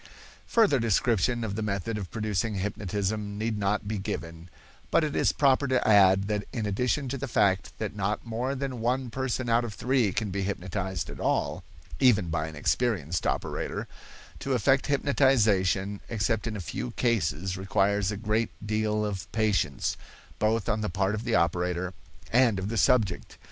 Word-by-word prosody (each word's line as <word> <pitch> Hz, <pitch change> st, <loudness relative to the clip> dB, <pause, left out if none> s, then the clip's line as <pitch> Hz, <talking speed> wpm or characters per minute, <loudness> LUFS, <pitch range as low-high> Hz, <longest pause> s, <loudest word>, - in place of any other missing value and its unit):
Further 210 Hz, -, +4 dB
description 115 Hz, +1 st, +1 dB
of 100 Hz, -3 st, -3 dB
the 110 Hz, -, -3 dB
method 105 Hz, +1 st, -2 dB
of 100 Hz, -4 st, -5 dB
producing 110 Hz, 0 st, -1 dB
hypnotism 100 Hz, +1 st, -2 dB
need 110 Hz, 0 st, -2 dB
not 100 Hz, +1 st, 0 dB
be 105 Hz, -1 st, -2 dB
given; 85 Hz, -2 st, -6 dB, 0.4 s
but -, -, +3 dB
it 150 Hz, -1 st, -2 dB
is -, -, +3 dB
proper 140 Hz, 0 st, +3 dB
to 130 Hz, -1 st, +1 dB
add 95 Hz, -2 st, +6 dB
that 105 Hz, 0 st, -1 dB
in 110 Hz, -3 st, -3 dB
addition 125 Hz, +7 st, 0 dB
to 135 Hz, +1 st, -3 dB
the 140 Hz, -, -3 dB
fact 100 Hz, -5 st, +1 dB
that 110 Hz, -1 st, -4 dB
not 105 Hz, +3 st, -2 dB
more 120 Hz, +4 st, -2 dB
than 130 Hz, -2 st, -4 dB
one 125 Hz, +1 st, 0 dB
person 130 Hz, 0 st, -2 dB
out 115 Hz, +1 st, +3 dB
of 110 Hz, -3 st, -5 dB
three 125 Hz, -1 st, +1 dB
can 105 Hz, 0 st, -2 dB
be 100 Hz, +1 st, -2 dB
hypnotized 95 Hz, 0 st, -3 dB
at -, -, -10 dB
all, -, -, 0 dB, 0.4 s
even 105 Hz, -9 st, +4 dB
by 80 Hz, -1 st, -1 dB
an 80 Hz, -, -8 dB
experienced 90 Hz, -, 0 dB
operator, -, -, -2 dB, 0.5 s
to 135 Hz, -, -2 dB
effect 135 Hz, +3 st, +2 dB
hypnotization 105 Hz, -9 st, +2 dB
except 110 Hz, 0 st, 0 dB
in 110 Hz, -, -3 dB
a -, -, -4 dB
few 120 Hz, +7 st, -4 dB
cases 95 Hz, -7 st, 0 dB
requires 100 Hz, +1 st, +1 dB
a 105 Hz, -, -4 dB
great 110 Hz, +1 st, 0 dB, 0.2 s
deal 105 Hz, 0 st, 0 dB
of 100 Hz, -3 st, -5 dB
patience, 105 Hz, -10 st, 0 dB, 0.4 s
both 110 Hz, 0 st, +1 dB
on 110 Hz, -1 st, 0 dB
the 105 Hz, -, -1 dB
part 95 Hz, +3 st, 0 dB
of 110 Hz, +2 st, -4 dB
the 115 Hz, -2 st, +1 dB
operator 90 Hz, +2 st, 0 dB, 0.4 s
and 120 Hz, -4 st, +4 dB
of 95 Hz, +2 st, -3 dB
the 115 Hz, -, -3 dB
subject. 110 Hz, -9 st, +1 dB
105 Hz, 175 wpm, -28 LUFS, 95-120 Hz, 0.5 s, add